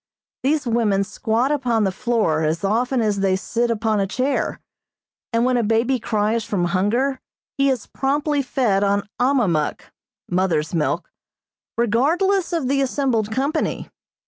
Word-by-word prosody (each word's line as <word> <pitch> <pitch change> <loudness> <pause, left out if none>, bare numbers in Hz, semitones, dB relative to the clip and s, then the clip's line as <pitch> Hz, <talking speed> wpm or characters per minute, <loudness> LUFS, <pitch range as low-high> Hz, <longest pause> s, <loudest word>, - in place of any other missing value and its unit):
These 295 +2 +1
women 225 -4 +1
squat 220 +6 -1
upon 245 -6 +1
the 190 - +1
floor 215 -7 0
as 160 +3 -1
often 240 +5 +1
as 205 -2 0
they 195 -1 +2
sit 235 +5 -1
upon 220 -2 0
a 195 - 0
chair, 265 +6 -1 0.7
and 230 0 +2
when 255 -1 +2
a 240 - +1
baby 230 +4 +1
cries 220 0 0
from 190 -4 -1
hunger 220 +10 0 0.4
he 275 0 +2
is 255 -4 -1
promptly 290 +2 0
fed 240 -7 +1
on 200 0 +1
ahmahmuk, 230 - +1 0.5
(mother's 175 -4 0
milk,) 165 -3 -1 0.7
regardless 330 - +2
of 330 -7 -1
the 275 +1 +1
assembled 255 -5 0
company. 280 +7 -1
230 Hz, 145 wpm, -21 LUFS, 200-265 Hz, 0.7 s, they